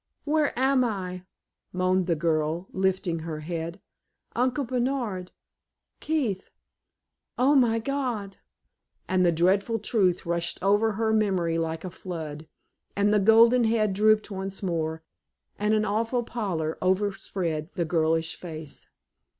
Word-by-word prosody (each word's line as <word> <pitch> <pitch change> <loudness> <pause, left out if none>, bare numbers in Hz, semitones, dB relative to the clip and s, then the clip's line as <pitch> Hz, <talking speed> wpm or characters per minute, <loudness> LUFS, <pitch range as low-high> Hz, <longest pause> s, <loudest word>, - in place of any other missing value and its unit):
"Where 300 0 +2
am 265 0 +3
I?" 185 -5 -3 0.5
moaned 185 0 +1
the 170 - +2
girl, 160 +2 0
lifting 190 -3 0
her 160 -1 -5
head. 165 +2 -5 0.6
"Uncle 255 +4 +1
Bernard 240 -7 -2 0.7
Keith 250 -12 -1 0.9
oh, 260 +4 +4
my 240 -5 +4
God!" 230 -6 -3 0.7
And 185 0 +2
the 175 - +4
dreadful 195 +7 +2
truth 195 -5 +1
rushed 170 0 -1
over 205 +3 +3
her 220 +1 0
memory 185 -6 +1
like 165 0 -3
a 180 - -5
flood, 160 -4 -7 0.5
and 205 +1 +2
the 210 - +4
golden 230 +4 +6
head 220 -3 +2
drooped 215 +1 +3
once 195 0 -5
more, 160 -3 -2 0.6
and 210 +1 +2
an 215 0 +1
awful 225 +4 0
pallor 180 -10 -3
overspread 185 -4 -1
the 170 - 0
girlish 160 0 +1
face. 160 -4 -8
190 Hz, 125 wpm, -26 LUFS, 170-225 Hz, 0.9 s, golden